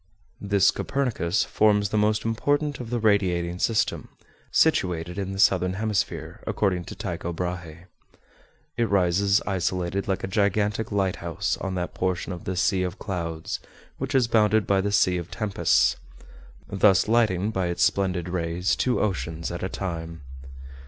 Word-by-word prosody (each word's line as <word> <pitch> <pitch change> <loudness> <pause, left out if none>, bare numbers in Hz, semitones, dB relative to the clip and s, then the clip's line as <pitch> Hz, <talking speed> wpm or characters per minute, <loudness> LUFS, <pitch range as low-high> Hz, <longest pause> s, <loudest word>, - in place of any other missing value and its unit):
This 100 -1 +3
Copernicus 115 -9 -1
forms 105 -1 +2
the 110 - -3
most 105 +1 +1
important 145 +6 0
of 120 -3 -6
the 120 - -1
radiating 90 -5 +1
system, 110 +1 0 0.4
situated 90 +1 +1
in 95 -1 -3
the 95 - -5
southern 90 -2 +3
hemisphere, 105 0 -2
according 90 -4 0
to - - -8
Tycho 85 -4 -4
Brahé. 90 -1 -5 0.9
It 115 -1 +1
rises 100 +1 +2
isolated 95 0 -1
like 95 -2 -1
a - - -1
gigantic 105 +2 0
lighthouse 95 -4 -1
on 95 -1 -4
that 90 -1 -3
portion 95 0 -2
of 85 - -9
the 95 - -2
"Sea 95 +1 +1
of 90 +2 -3
Clouds," 85 -5 -4 0.4
which - - -3
is 130 -3 +4
bounded 110 -2 +3
by 100 -1 +2
the 100 +1 -1
"Sea 90 -3 +3
of 85 0 -7
Tempests," 105 -1 +2 0.7
thus 95 -2 +3
lighting 110 -3 +2
by 95 -4 -1
its 85 - 0
splendid 90 -3 +1
rays 90 +1 -1
two 125 -1 0
oceans 80 -5 -2
at 85 - -5
a 95 - -2
time. 85 -4 -5
95 Hz, 150 wpm, -25 LUFS, 90-105 Hz, 0.9 s, is